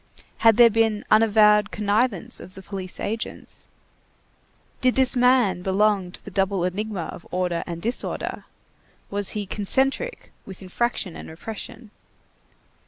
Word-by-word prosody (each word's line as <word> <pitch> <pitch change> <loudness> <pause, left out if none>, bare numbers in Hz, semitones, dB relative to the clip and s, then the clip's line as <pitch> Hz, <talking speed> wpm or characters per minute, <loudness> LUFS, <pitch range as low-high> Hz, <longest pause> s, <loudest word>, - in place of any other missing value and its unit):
Had 225 -2 +5
there 235 -1 +8
been 220 -1 +1
unavowed 210 -1 +5
connivance 210 -1 0
of 185 - -12
the 190 - -11
police 190 -1 -5
agents? 225 +2 -5 1.1
Did 255 -1 +3
this 265 0 +3
man 245 -7 +3
belong 195 -1 +1
to - - -11
the - - -8
double 195 -2 0
enigma 195 0 -2
of 170 - -12
order 180 -2 -1
and 170 -1 -6
disorder? 235 +3 -4 0.7
Was 200 -1 -2
he 205 - -2
concentric 265 - -1
with 190 0 -11
infraction 190 -1 -2
and - - -9
repression? 220 +6 -9
210 Hz, 130 wpm, -24 LUFS, 190-225 Hz, 1.1 s, there